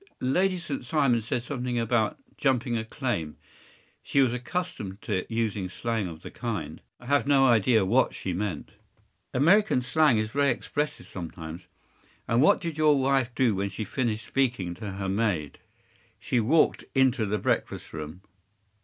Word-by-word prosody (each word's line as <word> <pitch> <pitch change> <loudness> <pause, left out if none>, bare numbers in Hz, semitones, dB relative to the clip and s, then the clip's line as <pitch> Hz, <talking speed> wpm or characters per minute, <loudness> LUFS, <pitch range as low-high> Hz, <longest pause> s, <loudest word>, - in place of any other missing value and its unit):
” - - -39
“Lady 185 +9 +1
St. 145 -6 -5
Simon 125 -4 +2
said 115 +2 -2
something 125 -2 -3
about 115 -2 +1 0.2
‘jumping 125 -3 +1
a 110 - -1
claim.’ 110 - -3 0.6
She 140 - 0
was 130 -3 +4
accustomed 125 - -4
to 105 -5 -2
use 105 -5 -1
slang 115 -4 -2
of 80 -2 -9
the - - -8
kind. - - -5 0.2
I 120 - -15
have 140 +1 +2
no 140 -2 +5
idea 115 -3 +4
what 120 +7 +2
she 95 - -3
meant.” 90 -4 -3 0.6
“American 170 +1 +4
slang 150 -2 +3
is 110 0 -1
very 140 +1 +2
expressive 150 +2 -2
sometimes. 85 -1 -8 0.6
And 115 +2 +3
what 150 - +5
did 165 -2 -5
your 150 -2 +5
wife 135 -2 +2
do 125 -4 +3
when 100 +1 -1
she 100 +3 -5
finished 110 0 -2
speaking 120 -10 0
to 100 +2 -6
her 95 0 -4
maid?” 95 -8 -1 0.6
“She 125 - 0
walked 145 +9 +3
into 130 -4 +3
the 105 +2 0
breakfast - - -2
room. 80 +3 -7
120 Hz, 160 wpm, -27 LUFS, 100-135 Hz, 0.6 s, no